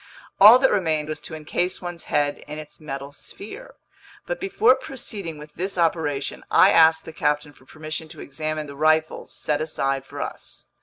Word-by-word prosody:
All 215 +5 +10
that 265 0 +3
remained 160 -6 0
was 155 - -4
to 160 - -8
encase 175 +4 -2
one's 175 -2 -5
head 145 -1 0
in 150 +1 -6
its 155 -1 -10
metal 140 -2 -6
sphere. 210 - -10 0.5
But - - -4
before 255 - +4
proceeding 205 - -6
with 150 0 -12
this 185 +2 -4
operation, 160 -5 -1
I 185 +4 +6
asked 160 0 +5
the 160 - -9
captain 150 -1 -1
for 130 - -22
permission 155 +2 -6
to 155 -1 -12
examine 155 +2 -4
the 140 -1 -10
rifles 155 +2 +1
set 150 0 -2
aside 135 -4 -1
for - - -10
us. - - -7
155 Hz, 175 wpm, -23 LUFS, 150-175 Hz, 0.5 s, All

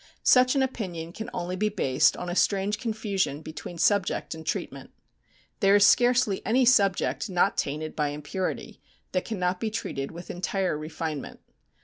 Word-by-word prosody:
Such 255 +1 +5
an 270 - +3
opinion 175 -10 -4
can 220 +2 -6
only 180 +1 -3
be 210 +3 0
based 140 -11 +2
on 180 - -5
a 175 - -3
strange 200 +2 +1
confusion 210 - -2
between 160 +2 -8
subject 195 +3 +1
and 160 0 -9
treatment. 155 - -4 0.7
There 195 0 +5
is 205 0 +6
scarcely 245 -3 +3
any 245 +5 +3
subject 200 -3 +2
not 185 +1 +2
tainted 155 +2 -3
by 150 -1 0
impurity, 150 +6 -4 0.3
that 185 - -1
cannot 180 -4 -1
be 225 - -1
treated 140 -10 -4
with 170 +1 -8
entire 185 0 -1
refinement. 155 -1 -5
185 Hz, 155 wpm, -26 LUFS, 165-215 Hz, 0.7 s, is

